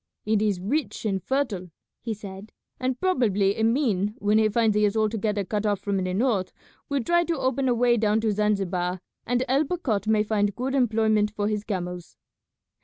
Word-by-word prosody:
"It 215 -1 +2
is 205 -4 +1
rich 260 +8 -2
and 195 -3 0
fertile" 225 -8 -2 0.3
he 225 -2 -3
said; 200 0 -10 0.3
"and 255 0 -1
probably 210 - +2
Emin 220 -3 +1
when 210 -2 +2
he 215 0 +3
finds 220 -1 +2
he 210 - +3
is 210 +1 +2
altogether 215 -1 0
cut 205 +2 -2
off 205 -2 0
from 200 -1 -2
the 185 -1 -1
north 210 -5 +1 0.4
will 280 -3 0
try 345 +6 +3
to 335 -2 -1
open 265 0 0
a 245 - +2
way 240 0 +3
down 215 0 +2
to 220 -1 +1
Zanzibar, 195 -3 0 0.3
and 245 +2 +1
El 270 +4 +3
Bakhat 255 - -2
may 215 -1 +3
find 205 -2 0
good 260 +2 -2
employment 220 -4 +2
for 210 -1 -2
his 210 -1 -1
camels." 180 -4 -5
215 Hz, 185 wpm, -25 LUFS, 200-245 Hz, 0.4 s, he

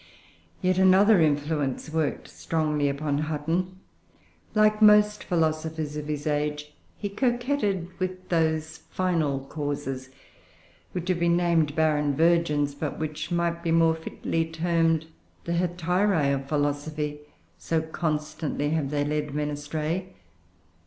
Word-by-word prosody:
200.] - - +1
Yet 185 0 +3
another 190 +1 +6
influence 145 -1 0
worked 160 -2 -1
strongly 150 -3 -1
upon 140 0 -1
Hutton. 165 +5 -2 0.8
Like 215 0 +4
most 210 0 +6
philosophers 160 -2 -1
of 150 0 -5
his 150 -1 -3
age, 150 0 -2 0.2
he 205 - -3
coquetted 240 -4 0
with 185 0 -4
those 160 -1 0
final 160 -7 0
causes 140 -3 -4 0.8
which 180 -1 -4
have 180 -2 +1
been 170 0 +3
named 165 -4 +2
barren 150 -3 +2
virgins, 160 -3 +2
but 145 0 -4
which 155 0 -4
might 170 0 0
be 170 - -2
more 165 0 +4
fitly 160 0 -2
termed 165 -1 +1 0.4
the 170 - -2
hetairoe 175 -2 +1
of 135 0 -4
philosophy, 150 0 -1 0.4
so 165 - 0
constantly 155 -2 -2
have 155 -4 0
they 145 0 0
led 150 -1 -2
men 150 0 -1
astray. 155 +5 -3
160 Hz, 125 wpm, -26 LUFS, 150-175 Hz, 0.8 s, another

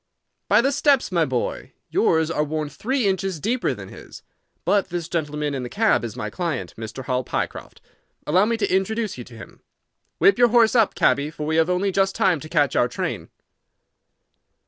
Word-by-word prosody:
"By - - +5
the 270 +3 +1
steps, 285 -4 +2
my 170 -3 +2
boy. 130 -4 -3 0.2
Yours 160 0 +2
are 150 - 0
worn 155 0 -3
three 255 - -2
inches 190 -3 -1
deeper 235 - -1
than - - -10
his. - - -12 0.4
But 200 -2 +2
this 175 -2 -4
gentleman 150 -3 -2
in 135 - -3
the 125 - -5
cab 220 - +2
is 115 -2 -5
my 125 - -5
client, 155 - -3
Mr. 115 +4 -7
Hall 130 -1 -1
Pycroft. - - -5 0.4
Allow 185 +6 +3
me 230 +1 0
to 200 -4 0
introduce 210 - -1
you - - -6
to 120 - -14
him. - - -13 0.6
Whip 195 +3 +4
your 245 - +7
horse 230 -1 +4
up, 225 -4 +3
cabby, 140 +1 +2
for 150 -1 -6
we 160 +1 0
have 165 +2 +3
only 185 +2 +1
just 195 0 +1
time 180 -5 +2
to 155 - -10
catch 150 -4 +1
our 120 - +3
train." 120 - -4
170 Hz, 190 wpm, -23 LUFS, 150-205 Hz, 0.6 s, your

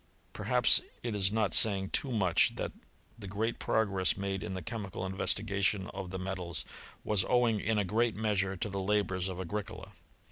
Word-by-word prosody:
Perhaps - - +4 0.2
it 120 -3 -2
is 95 -1 +2
not 110 -2 0
saying 95 -3 +5
too 135 - 0
much, 95 -7 +3
that - - -3 0.5
the 100 - -8
great 110 +4 -2
progress 100 -5 +1
made 100 -1 -3
in 105 -2 -5
the 95 - -4
chemical 105 -6 -5
investigation 100 0 -1
of 95 -2 -6
the 95 - -5
metals, 95 -3 -4 0.4
was 105 -3 +3
owing 120 -3 +3
in 110 +2 0
a 105 - +1
great 110 +2 +1
measure 100 -3 0
to 105 - -3
the 100 0 -4
labours 95 -2 0
of 95 -1 -6
Agricola. 100 +3 -5
100 Hz, 175 wpm, -31 LUFS, 95-110 Hz, 0.5 s, saying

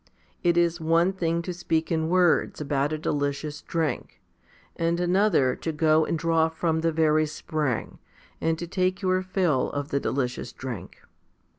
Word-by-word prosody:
It 175 -1 +2
is 170 -1 +2
one 165 +3 +3
thing 170 -2 -1
to 180 - -4
speak 165 -2 -1
in 160 -1 0
words 180 -2 +3
about 145 -1 0
a 155 - -1
delicious 145 0 -2
drink, 160 -6 -3 0.6
and 170 +1 0
another 180 -7 +3
to 165 - -3
go 155 0 +3
and 165 - -1
draw 160 0 +2
from 160 0 -1
the 165 0 +1
very 155 -1 +3
spring, 150 -4 -3 0.4
and 160 0 +1
to 175 - -4
take 185 +2 -1
your 185 0 +2
fill 185 -8 +1
of 145 0 -4
the 140 - 0
delicious 130 -2 -2
drink. 125 -8 -8
160 Hz, 160 wpm, -26 LUFS, 150-175 Hz, 0.6 s, one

